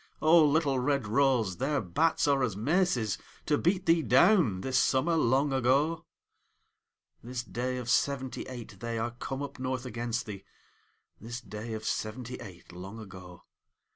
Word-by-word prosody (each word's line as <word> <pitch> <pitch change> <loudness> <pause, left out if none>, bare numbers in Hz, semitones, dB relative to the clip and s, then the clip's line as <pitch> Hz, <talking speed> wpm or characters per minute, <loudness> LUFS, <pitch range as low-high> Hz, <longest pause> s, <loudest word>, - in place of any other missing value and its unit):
O, 160 +1 +6
little 145 -3 +2
red 140 0 0
rose, 115 -4 +2
their 140 +3 0
bats 145 - +1
are 140 -1 +3
as 110 -7 -1
maces 130 - +1 0.3
To 150 - +2
beat 180 +5 +1
thee 165 -1 +4
down, 130 - +4
this 130 +2 +1
summer 140 +6 +2
long 135 -1 +2
ago! 140 +6 +1 1.1
This 125 0 -5
day 125 +2 -3
of 125 -2 -6
seventy 130 +1 0
eight 125 -3 -9
they 115 0 -3
are 115 +1 -2
come 135 +3 -5
up 140 -1 -8
north 130 -1 -3
against 120 0 -3
thee 100 -2 -8 0.8
This 120 +3 -6
day 110 0 -7
of 110 0 -6
seventy 120 +3 -3
eight 95 -8 -12
long 95 +5 -9
ago! 90 -4 -11
125 Hz, 155 wpm, -29 LUFS, 110-140 Hz, 1.1 s, O